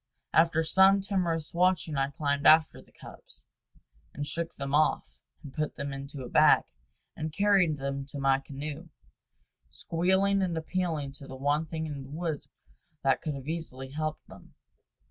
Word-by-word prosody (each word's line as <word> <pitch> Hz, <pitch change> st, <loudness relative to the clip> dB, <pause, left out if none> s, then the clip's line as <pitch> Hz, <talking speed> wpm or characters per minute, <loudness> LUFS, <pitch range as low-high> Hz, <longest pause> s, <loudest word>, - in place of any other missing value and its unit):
After 160 Hz, 0 st, +4 dB
some 190 Hz, +4 st, +5 dB
timorous 180 Hz, -5 st, -1 dB
watching 175 Hz, -3 st, +1 dB
I 135 Hz, 0 st, +1 dB
climbed 145 Hz, 0 st, 0 dB
after 155 Hz, 0 st, +5 dB
the -, -, -23 dB
cubs, -, -, -14 dB, 0.7 s
and 145 Hz, -, -3 dB
shook 170 Hz, +3 st, -4 dB
them 140 Hz, 0 st, -5 dB
off, 155 Hz, +1 st, +1 dB, 0.2 s
and 140 Hz, -3 st, -10 dB
put 155 Hz, -1 st, -3 dB
them 140 Hz, 0 st, -4 dB
into 140 Hz, 0 st, -7 dB
a -, -, -6 dB
bag, -, -, +5 dB, 0.5 s
and 155 Hz, 0 st, -4 dB
carried 190 Hz, -3 st, +3 dB
them 140 Hz, 0 st, -4 dB
to 145 Hz, -, -8 dB
my 135 Hz, 0 st, +3 dB
canoe, 145 Hz, +4 st, -7 dB, 0.8 s
squealing 190 Hz, -, +1 dB
and 175 Hz, -3 st, -1 dB
appealing 160 Hz, -4 st, -2 dB
to 140 Hz, 0 st, -12 dB
the 130 Hz, -, -8 dB
one 145 Hz, +4 st, 0 dB
thing 160 Hz, 0 st, -4 dB
in 145 Hz, -3 st, -6 dB
the 135 Hz, -, -11 dB
woods 160 Hz, 0 st, -4 dB, 0.6 s
that 135 Hz, -, +2 dB
could 155 Hz, -3 st, -3 dB
easily 155 Hz, -5 st, -5 dB
have 135 Hz, -, -13 dB
helped 155 Hz, 0 st, -3 dB
them. -, -, -15 dB
155 Hz, 165 wpm, -29 LUFS, 140-170 Hz, 0.8 s, some